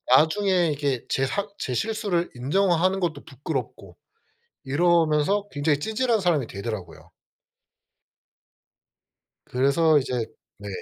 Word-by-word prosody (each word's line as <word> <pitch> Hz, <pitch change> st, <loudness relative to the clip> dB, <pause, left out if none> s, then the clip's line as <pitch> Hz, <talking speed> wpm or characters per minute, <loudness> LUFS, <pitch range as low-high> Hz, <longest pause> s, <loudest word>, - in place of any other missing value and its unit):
나중에 175 Hz, +1 st, +3 dB
이게 140 Hz, -4 st, -2 dB
제 135 Hz, -, 0 dB
사 200 Hz, +9 st, -2 dB
제 125 Hz, -, -3 dB
실수를 205 Hz, -, -1 dB
인정하는 185 Hz, +7 st, +1 dB
것도 160 Hz, -5 st, -2 dB
부끄럽고 135 Hz, 0 st, -6 dB, 0.7 s
이러면서 170 Hz, +5 st, +2 dB
굉장히 145 Hz, -1 st, 0 dB
찌질한 225 Hz, +3 st, 0 dB
사람이 160 Hz, -9 st, +1 dB
되더라고요. 100 Hz, -4 st, -7 dB, 2.4 s
그래서 145 Hz, +5 st, +3 dB
이제 125 Hz, -3 st, -2 dB, 0.3 s
네. 100 Hz, 0 st, -10 dB
160 Hz, 250 characters per minute, -25 LUFS, 135-190 Hz, 2.4 s, 나중에